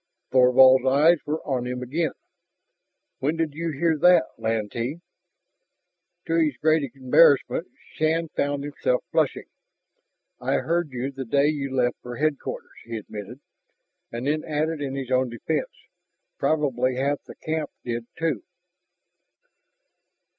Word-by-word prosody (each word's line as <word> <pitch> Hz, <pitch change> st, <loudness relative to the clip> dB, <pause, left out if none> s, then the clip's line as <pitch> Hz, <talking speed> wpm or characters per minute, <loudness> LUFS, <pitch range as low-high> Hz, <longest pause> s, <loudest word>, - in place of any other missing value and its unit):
Thorvald's 130 Hz, 0 st, +6 dB
eyes 150 Hz, +5 st, +5 dB
were 155 Hz, +2 st, -2 dB
on 125 Hz, -4 st, -1 dB
him 125 Hz, 0 st, -4 dB
again. 150 Hz, +5 st, -1 dB, 1.1 s
"When 150 Hz, +4 st, 0 dB
did 160 Hz, -3 st, -1 dB
you 165 Hz, +2 st, -3 dB
hear 160 Hz, +1 st, 0 dB
that, 175 Hz, -4 st, +5 dB
Lantee?" 115 Hz, +6 st, -2 dB, 1.3 s
To 165 Hz, -, -2 dB
his 155 Hz, -5 st, +2 dB
great 155 Hz, -4 st, +2 dB
embarrassment, 145 Hz, +5 st, +4 dB, 0.3 s
Shann 160 Hz, +1 st, +1 dB
found 145 Hz, -1 st, -1 dB
himself 140 Hz, -3 st, -1 dB
flushing. -, -, +1 dB, 0.9 s
"I -, -, -1 dB
heard 170 Hz, -1 st, 0 dB
you, 130 Hz, +1 st, -4 dB
the 135 Hz, 0 st, -6 dB
day 140 Hz, +4 st, +2 dB
you 140 Hz, -3 st, -3 dB
left 125 Hz, -2 st, +1 dB
for 120 Hz, 0 st, -7 dB
Headquarters," 150 Hz, +1 st, -3 dB
he 115 Hz, 0 st, -5 dB
admitted, 110 Hz, +4 st, -8 dB, 0.7 s
and 120 Hz, +2 st, -5 dB
then 155 Hz, +2 st, 0 dB
added 155 Hz, 0 st, -2 dB
in 135 Hz, -1 st, -3 dB
his 135 Hz, -2 st, -5 dB
own 130 Hz, 0 st, +2 dB
defense, 120 Hz, -, -2 dB, 0.7 s
"Probably 130 Hz, -5 st, +1 dB
half 140 Hz, +2 st, 0 dB
the -, -, -11 dB
camp 155 Hz, -2 st, -3 dB, 0.2 s
did, 120 Hz, -1 st, -3 dB
too." 160 Hz, -10 st, -1 dB
140 Hz, 130 wpm, -25 LUFS, 125-155 Hz, 1.3 s, Thorvald's